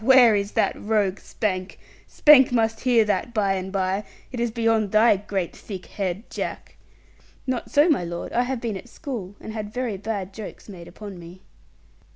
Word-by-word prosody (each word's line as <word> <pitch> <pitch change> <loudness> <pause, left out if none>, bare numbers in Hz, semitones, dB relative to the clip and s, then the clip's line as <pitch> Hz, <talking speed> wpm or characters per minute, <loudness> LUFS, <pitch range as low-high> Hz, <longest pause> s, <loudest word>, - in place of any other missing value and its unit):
Where 250 -2 +7
is 200 0 -1
that - - +2
rogue 205 -3 +1
Spank? 185 -3 -3 0.3
Spank 280 -4 +6
must 225 -2 +1
hear 240 -3 +4
that 235 +3 -1
by 200 -3 +2
and 190 0 -4
by. 190 +1 0 0.3
It 250 - -5
is 235 0 +1
beyond 225 -2 +1
thy 215 0 +6
great 195 -3 -3
thick 190 -4 -8
head, 195 +2 -4
Jack.' - - -5 0.7
'Not 255 -2 -2
so, 290 +3 +5
my 290 - +2
lord; 170 0 -5
I 240 - +3
have 250 0 -2
been 225 -4 -2
at 245 - -12
school, 230 - -6
and 220 - -8
had 210 -2 -5
very 245 -4 -2
bad 200 -2 -4
jokes 215 0 -9
made 180 -5 -10
upon 195 0 -9
me.' 175 +2 -12
215 Hz, 185 wpm, -24 LUFS, 190-235 Hz, 0.7 s, Where